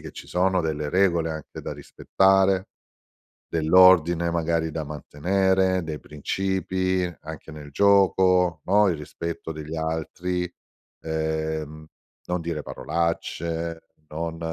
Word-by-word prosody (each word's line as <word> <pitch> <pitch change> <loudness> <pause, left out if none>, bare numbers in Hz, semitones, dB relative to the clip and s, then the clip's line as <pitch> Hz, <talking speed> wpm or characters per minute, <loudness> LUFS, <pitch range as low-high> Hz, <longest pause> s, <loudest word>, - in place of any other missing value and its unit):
che - - -9
ci - - -10
sono 95 +1 +1
delle 75 -2 -2
regole 85 -2 +2
anche 80 -2 -7
da - - -5
rispettare, 95 0 +2 0.8
dell'ordine 85 0 +5
magari 85 -1 0
da 80 0 -4
mantenere, 95 +6 0
dei 80 -2 -5
principi, 95 +3 -1 0.2
anche 80 0 -9
nel 75 -1 -10
gioco, 95 -2 +3
no, 105 +2 +4
il 85 - 0
rispetto 80 +2 -6
degli 75 +1 -7
altri, 85 +3 -2 0.5
ehm, 80 -1 -3 0.4
non 90 0 -1
dire 80 -3 -4
parolacce, 85 0 -3 0.3
non 80 +1 -4
85 Hz, 110 wpm, -25 LUFS, 80-95 Hz, 0.8 s, dell'ordine